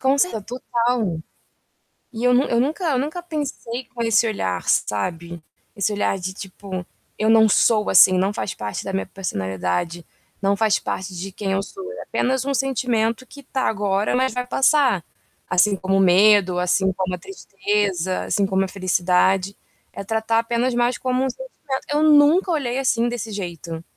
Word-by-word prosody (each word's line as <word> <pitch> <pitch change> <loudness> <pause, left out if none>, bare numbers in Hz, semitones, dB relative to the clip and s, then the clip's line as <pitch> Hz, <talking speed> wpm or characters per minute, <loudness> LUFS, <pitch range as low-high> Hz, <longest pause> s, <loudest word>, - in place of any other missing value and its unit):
Com 265 +1 +2
cert 245 - 0
total. 235 -7 -1 0.9
E 225 0 -6
eu 250 0 +4
não 255 +3 +4
eu 235 - +1
nunca 300 +9 -1
eu 295 -5 +1
nunca 305 +6 -3
pensei 280 -7 -5
com 240 - -5
esse 230 0 +3
olhar, 95 - -2
sabe, 170 - -1 0.3
esse 200 +1 0
olhar 205 -1 0
de 190 0 -5
tipo: 190 -1 -7 0.3
"Eu 215 - +1
não 220 0 +6
sou 215 +1 +3
assim, 185 - +7
não 190 +2 +1
faz 205 - -3
parte 105 -1 -5
da 195 - -5
minha 195 - -1
personalidade, 95 - -3 0.4
não 200 0 +2
faz 215 0 +2
parte 190 0 -5
de 190 +3 -6
quem 195 +1 -4
eu 195 0 +1
sou, 380 - -9
é - - -8
apenas 260 0 -1
um 280 - -1
sentimento 250 -3 0
que 280 - -13
está 265 0 -3
agora, 205 0 0
mas 260 +1 +1
vai 250 0 -3
passar, 260 - +3 0.5
assim 195 +3 +3
como 195 0 0
o - - +3
medo, 190 0 +5
assim 185 +2 +1
como 185 0 -3
a - - -10
tristeza, 195 - -2
assim 200 - +1
como 190 0 +1
a - - -2
felicidade, 185 +1 +1 0.4
é - - -6
tratar 225 +2 0
apenas 235 +2 0
mais 240 +1 +1
como 255 0 -1
um 265 - 0
sentimento", 290 - -6
eu 295 +1 +2
nunca 310 +5 +5
olhei 265 -5 -1
assim 240 -3 +1
desse 230 -2 -5
jeito. 170 -4 -6
210 Hz, 180 wpm, -22 LUFS, 190-255 Hz, 0.9 s, assim